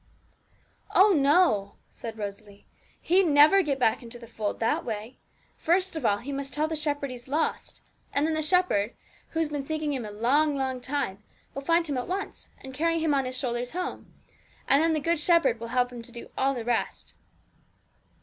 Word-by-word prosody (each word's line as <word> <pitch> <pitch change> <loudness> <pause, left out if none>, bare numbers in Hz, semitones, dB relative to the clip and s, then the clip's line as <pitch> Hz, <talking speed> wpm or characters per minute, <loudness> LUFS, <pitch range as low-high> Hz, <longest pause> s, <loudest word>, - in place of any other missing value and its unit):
'Oh 395 +2 +7
no!' 280 - +3 0.2
said 225 -1 -8
Rosalie; 205 -1 -8 0.3
'he'd 375 +2 +3
never 300 +6 +6
get 285 -6 -1
back 225 -4 +2
to 240 0 -10
the 235 - -11
fold 220 -3 -4
that 225 - 0
way. 220 +2 -6 0.4
First 365 +2 +1
of 305 -7 0
all, 205 - +2
he 260 +7 -7
must 275 0 -3
tell 305 +1 +1
the 320 - -3
Shepherd 290 -3 -1
he's 245 0 -10
lost; 305 +4 -2 0.3
and 285 +2 +1
then 320 - 0
the 310 - 0
Shepherd, 305 - +2 0.3
who 325 - -3
has 320 -2 +1
been 290 -2 -3
seeking 310 0 -2
him 260 -3 -3
a 210 - -6
long, 275 +8 +2
long 260 -2 -2
time, 260 -7 -3 0.3
will 275 - -5
find 335 +4 +2
him 285 -5 -1
at 245 - -5
once, 385 +2 -5
and 265 0 -9
carry 330 +4 +1
him 320 -2 +1
on 270 -2 +1
His 255 0 -4
shoulders 245 0 -3
home; 360 +1 -5 0.6
and 280 - +5
then 325 0 +2
the 310 - +1
Good 335 +2 0
Shepherd 300 -8 +3
will 230 - -6
help 250 +1 +1
him 240 -1 -8
to 230 - -11
do 235 - -10
all 270 +1 +1
the 235 -2 -5
rest.' 240 -1 -2
275 Hz, 200 wpm, -27 LUFS, 240-315 Hz, 0.6 s, Oh